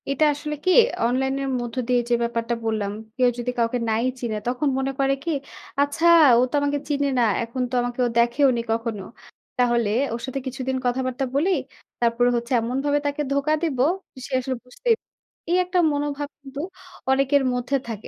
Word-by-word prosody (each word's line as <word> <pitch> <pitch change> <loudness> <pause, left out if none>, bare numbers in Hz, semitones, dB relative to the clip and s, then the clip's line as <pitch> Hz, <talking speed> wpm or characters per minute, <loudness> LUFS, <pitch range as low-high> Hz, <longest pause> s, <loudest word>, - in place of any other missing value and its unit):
এটা 275 +3 +2
আসলে 300 +1 -4
কি? 370 - +4 0.3
অনলাইন 265 +3 +1
এর 270 - -2
মধ্য 240 0 -5
দিয়ে 250 -1 +3
যে - - +2
ব্যাপারটা 235 0 -1
বললাম, 215 -3 -1 0.3
কেউ 250 -1 +4
যদি 245 +1 -2
কাউকে 230 +1 +1
নাই 220 +1 +1 0.2
চিনে, 230 -3 -2
তখন 250 +4 0
মনে 270 0 0
করে 275 0 +3
কি? 335 - -1 0.5
"আচ্ছা 285 +4 +1 0.3
ও - - +5
তো - - -18
আমাকে 285 0 0
চিনে 285 -1 +1
না। - - +4 0.2
এখন 235 +3 -4
তো - - -15
আমাকে 245 +1 -4 0.2
দেখেওনি 240 +1 +3
কখনো। 225 -3 -2 0.5
তাহলে 240 -3 +2 0.2
ওর 230 - -4
সাথে 270 +1 -4
কিছুদিন 260 0 -2
কথাবার্তা 255 +2 0
বলি। 310 +7 +2 0.5
তারপরে 240 +1 +3
হচ্ছে 235 +1 -3
এমনভাবে 270 +5 0
তাকে 285 +1 -1
ধোকা 280 +2 +1
দিব, 295 -7 -1 0.5
সে - - -11
আসলে 260 +1 -3
বুঝতেই 465 - 0
প" - - -73 0.5
এই 355 - +4
একটা 360 0 0
মনোভাব 290 0 -2
কিন্তু 275 0 -9 0.5
অনেকের 275 +1 +3
মধ্যে 250 +2 -1
থাকে। 220 -3 -6
255 Hz, 175 wpm, -23 LUFS, 240-285 Hz, 0.5 s, ও